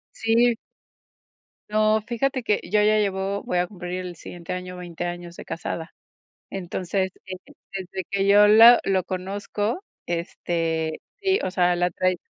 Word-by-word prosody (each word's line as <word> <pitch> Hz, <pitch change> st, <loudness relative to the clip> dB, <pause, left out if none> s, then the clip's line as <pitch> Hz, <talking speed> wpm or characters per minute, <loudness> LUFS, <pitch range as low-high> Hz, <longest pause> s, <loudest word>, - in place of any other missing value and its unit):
Sí. 230 Hz, +2 st, +3 dB, 1.2 s
No, 215 Hz, 0 st, +3 dB
fíjate 260 Hz, +2 st, -1 dB
que 210 Hz, -3 st, +1 dB
yo 210 Hz, 0 st, +2 dB
ya 215 Hz, +1 st, +4 dB
llevo 195 Hz, -1 st, -1 dB
voy 180 Hz, -, 0 dB
a 175 Hz, -, +2 dB
cumplir 180 Hz, -1 st, -5 dB
el 175 Hz, -1 st, -7 dB
siguiente 170 Hz, +1 st, -8 dB
año 180 Hz, 0 st, -5 dB
20 175 Hz, -1 st, -6 dB
años 175 Hz, 0 st, -6 dB
de -, -, -9 dB
casada. 165 Hz, 0 st, -5 dB, 0.6 s
Entonces, 190 Hz, 0 st, -2 dB, 0.6 s
desde 190 Hz, -1 st, -5 dB
que 200 Hz, 0 st, 0 dB
yo 205 Hz, +1 st, +7 dB
la 225 Hz, +3 st, +9 dB
lo 190 Hz, -1 st, +1 dB
conozco, 200 Hz, -, -3 dB, 0.3 s
este, 165 Hz, -2 st, -2 dB, 0.2 s
sí, 390 Hz, 0 st, +2 dB
o 185 Hz, -, -1 dB
sea, 180 Hz, -1 st, +3 dB
la 175 Hz, 0 st, +1 dB
tradi 185 Hz, +1 st, 0 dB
190 Hz, 145 wpm, -24 LUFS, 175-210 Hz, 1.2 s, la